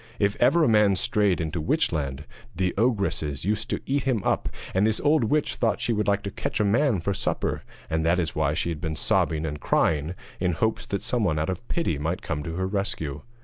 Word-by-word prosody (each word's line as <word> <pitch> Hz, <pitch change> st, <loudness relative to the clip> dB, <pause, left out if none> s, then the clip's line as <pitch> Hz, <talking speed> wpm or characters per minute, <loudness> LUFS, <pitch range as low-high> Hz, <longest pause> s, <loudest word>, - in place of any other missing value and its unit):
If 100 Hz, -1 st, +1 dB
ever 170 Hz, -1 st, +4 dB
a -, -, +4 dB
man 105 Hz, -3 st, +4 dB
strayed 105 Hz, -3 st, +2 dB
into 80 Hz, 0 st, -2 dB
Witchland 70 Hz, -3 st, 0 dB, 0.3 s
the 95 Hz, -1 st, 0 dB
ogresses 100 Hz, -, 0 dB
used 105 Hz, +2 st, -1 dB
to -, -, -2 dB
eat 140 Hz, +1 st, +1 dB
him 125 Hz, -6 st, 0 dB
up, -, -, 0 dB, 0.2 s
and 95 Hz, +3 st, +3 dB
this 110 Hz, -1 st, 0 dB
old 145 Hz, -4 st, +3 dB
witch 150 Hz, +5 st, +1 dB
thought 115 Hz, -3 st, +1 dB
she 120 Hz, -, 0 dB
would 105 Hz, -1 st, 0 dB
like 100 Hz, 0 st, +2 dB
to 100 Hz, -, -4 dB
catch -, -, -3 dB
a -, -, +3 dB
man 115 Hz, +1 st, +3 dB
for 100 Hz, +4 st, -1 dB
supper, -, -, -2 dB, 0.3 s
and 80 Hz, 0 st, 0 dB
that 85 Hz, +2 st, +3 dB
is 80 Hz, -7 st, -1 dB
why 75 Hz, -1 st, +1 dB
she 85 Hz, -, -1 dB
had 80 Hz, -3 st, -4 dB
been 80 Hz, -1 st, -2 dB
sobbing 80 Hz, 0 st, +1 dB
and 75 Hz, -1 st, -4 dB
crying 80 Hz, +2 st, +1 dB, 0.2 s
in 90 Hz, -1 st, +1 dB
hopes 110 Hz, +7 st, -1 dB
that 100 Hz, -, -3 dB
someone 105 Hz, -11 st, +1 dB
out 80 Hz, +4 st, 0 dB
of 95 Hz, +6 st, -7 dB
pity 125 Hz, -, -1 dB
might 80 Hz, +4 st, -2 dB
come 75 Hz, -, -2 dB
to 80 Hz, +3 st, -5 dB
her 95 Hz, +1 st, -1 dB
rescue. 95 Hz, -7 st, -2 dB
95 Hz, 225 wpm, -26 LUFS, 80-110 Hz, 0.3 s, ever